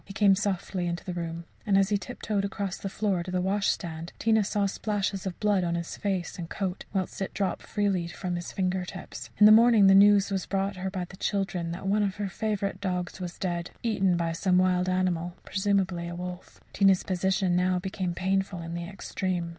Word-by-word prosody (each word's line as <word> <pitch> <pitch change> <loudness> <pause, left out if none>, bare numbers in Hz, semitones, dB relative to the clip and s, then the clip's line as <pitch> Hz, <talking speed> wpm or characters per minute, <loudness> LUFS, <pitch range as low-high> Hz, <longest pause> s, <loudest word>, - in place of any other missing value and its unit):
He 195 - -10
came 200 -2 +5
softly 190 -2 -2
into 170 0 -3
the 180 - -3
room, 170 -1 -4 0.2
and 195 -2 +3
as 195 0 +3
he 205 - +2
tiptoed 210 -3 -3
across 200 -1 -3
the 195 - -4
floor 195 -3 0
to 175 - -7
the 180 0 0
washstand, 180 -4 -1
Tina 220 -1 +3
saw 200 0 0
splashes 200 -1 -2
of 180 - -5
blood 205 -3 +2
on 170 -1 0
his 170 0 -4
face 190 -3 -3
and 165 -1 -5
coat, 190 -2 -3
whilst 190 0 -3
it 195 - -3
dripped 195 -1 -1
freely 195 -5 0
from 175 +1 -4
his 175 0 -5
finger 185 -1 -1
tips. 180 +1 -8
In 210 - +7
the 210 - +10
morning 225 -1 +7
the 195 - +7
news 200 0 +6
was 190 -2 -2
brought 195 0 -1
her 190 +1 -3
by 185 -2 -3
the 185 - -13
children 185 -5 -1
that 185 +3 -7
one 205 +2 +2
of 195 -2 0
her 205 -1 -3
favourite 200 -1 -2
dogs 180 -1 -3
was 175 -1 -5
dead 175 -2 -2
eaten 195 -6 +2
by 170 -1 0
some 180 +2 +2
wild 185 0 +2
animal, 175 -2 0
presumably 190 -3 0
a 170 - -5
wolf. 180 +1 -7
Tina's 195 -2 +4
position 190 0 +1
now 180 0 +2
became 180 -1 -3
painful 190 0 0
in 165 0 -6
the 170 0 -4
extreme. 185 -2 -3
190 Hz, 210 wpm, -28 LUFS, 180-200 Hz, 0.2 s, the